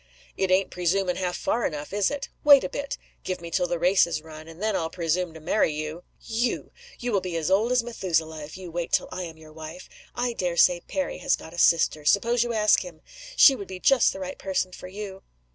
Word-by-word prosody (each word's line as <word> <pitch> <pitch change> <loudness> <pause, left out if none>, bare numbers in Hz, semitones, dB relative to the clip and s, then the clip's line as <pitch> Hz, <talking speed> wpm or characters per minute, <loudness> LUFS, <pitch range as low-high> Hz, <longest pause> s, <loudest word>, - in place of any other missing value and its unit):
"It 190 - 0
ain't 185 +1 +2
presuming 180 +1 0
half 180 -1 -2
far 235 - -1
enough, 150 +3 -3
is 205 -1 +2
it? 285 -1 -4 0.2
Wait 285 -2 +8
a - - -2
bit. 280 0 -4 0.3
Give 185 -1 -3
me 170 -1 -8
till 180 - +1
the 175 0 -1
race 180 +2 +4
is 160 -2 -3
run 155 0 -11
and 165 +1 -12
then 215 0 0
I'll 160 -3 -1
presume 170 +1 -1
to - - -9
marry 160 +2 +1
you." 155 +2 -5 0.2
"You! 235 +2 -2 0.3
You 245 -1 -3
will 200 -3 +2
be 180 -2 -3
as 160 +2 -1
old 215 +5 +3
as 250 -2 +3
Methuselah, 165 -9 -2
if 150 +4 -9
you 185 -2 -9
wait 170 0 -3
till - - +1
I 185 - -4
am 165 -3 -7
your 155 -1 -15
wife. 160 +3 -9 0.3
I 245 0 -1
dare 180 -5 -2
say 175 +1 +5
Perry 280 - -3
has 275 - +2
got 160 - -12
a 175 - -6
sister. 160 -3 +3
Suppose 230 +9 +3
you 240 - -3
ask 215 -2 +4
him? - - -10 0.3
She 275 - +8
would 200 - -7
be 185 -1 -7
just 265 +4 +4
the 195 - -8
right 185 0 -6
person 190 -1 -1
for 180 - -9
you." 195 0 -7
185 Hz, 240 wpm, -26 LUFS, 165-215 Hz, 0.3 s, Wait